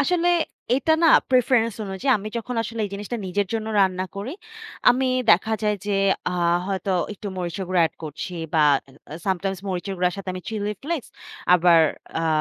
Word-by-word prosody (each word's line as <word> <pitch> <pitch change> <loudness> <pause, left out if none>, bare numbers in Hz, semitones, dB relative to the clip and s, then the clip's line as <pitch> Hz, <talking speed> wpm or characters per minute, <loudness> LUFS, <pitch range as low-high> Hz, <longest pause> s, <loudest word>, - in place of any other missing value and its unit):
আসলে 350 +4 +2 0.5
এটা 315 +4 +2
না - - +7 0.2
preference 250 -3 +3
অনুযায়ী, 195 +8 -2
আমি 210 +2 -6
যখন 245 +2 -5
আসলে 230 0 -5
এই 200 - -5
জিনিসটা 205 +4 -4
নিজের 200 +2 0
জন্য 220 -1 -2
রান্না 185 -1 +2
করি, 210 +7 -4 0.6
আমি 260 +2 +1 0.2
দেখা 220 +5 +4
যায় 210 -1 +1
যে, 200 -1 +1 0.3
আ - - -3 0.3
হয়তো 195 0 -2 0.2
একটু 205 +1 -9
মরিচের 180 +2 -3
গুঁড়ো 185 -2 +2
add - - -12
করছি 155 +4 -6 0.2
বা 155 - +5 0.3
এ 135 - -17 0.3
sometimes 190 0 -1
মরিচের 190 +1 -3
গুঁড়ার 180 +1 +1
সাথে 195 -1 -7
আমি 185 - -5
chili 210 -1 -2
flex, 315 -2 -2 0.5
আবার 170 -1 +6 0.4
অ্যা 165 0 0
200 Hz, 175 wpm, -23 LUFS, 185-230 Hz, 0.6 s, না